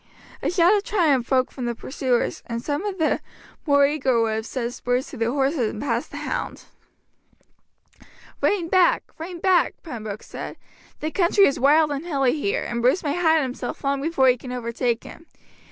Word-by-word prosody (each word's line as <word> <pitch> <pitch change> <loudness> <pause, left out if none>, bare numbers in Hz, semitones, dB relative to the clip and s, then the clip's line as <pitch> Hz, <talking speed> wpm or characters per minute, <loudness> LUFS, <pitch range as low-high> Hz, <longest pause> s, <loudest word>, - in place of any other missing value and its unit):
A - - 0
shout 355 +2 +4
of 405 - 0
triumph 305 - +1
broke 260 -1 +2
from 255 - -5
the 240 0 -2
pursuers, 255 0 -1
and 230 0 -3
some 290 +7 -3
of 390 -2 -4
the 320 -3 +1 0.5
more 285 -1 +5
eager 270 -4 +1
would 225 -1 +1
have 220 0 -3
set 245 -2 -3
spurs 245 +1 -1
to - - -9
their 230 0 0
horses 270 -3 +1
and 210 - -7
passed 285 - -2
the - - -8
hound. - - -4 1.8
"Rein 375 -5 +1
back, 365 0 +3 0.2
rein 345 +2 -6
back," 370 0 +3
Pembroke 220 - -6
said, - - -8 0.4
"the 310 - -2
country 390 +3 +4
is 275 - +1
wild 300 +3 +4
and 285 +1 -3
hilly 275 -7 +1
here, 240 -10 -1
and 235 0 -3
Bruce 255 +10 +2
may 290 -2 0
hide 320 -3 +3
himself 250 -1 -5
long 275 0 0
before 285 -3 +2
you 250 -1 +4
can 250 - -8
overtake 235 -1 -2
him. 330 - -12
275 Hz, 185 wpm, -23 LUFS, 245-325 Hz, 1.8 s, more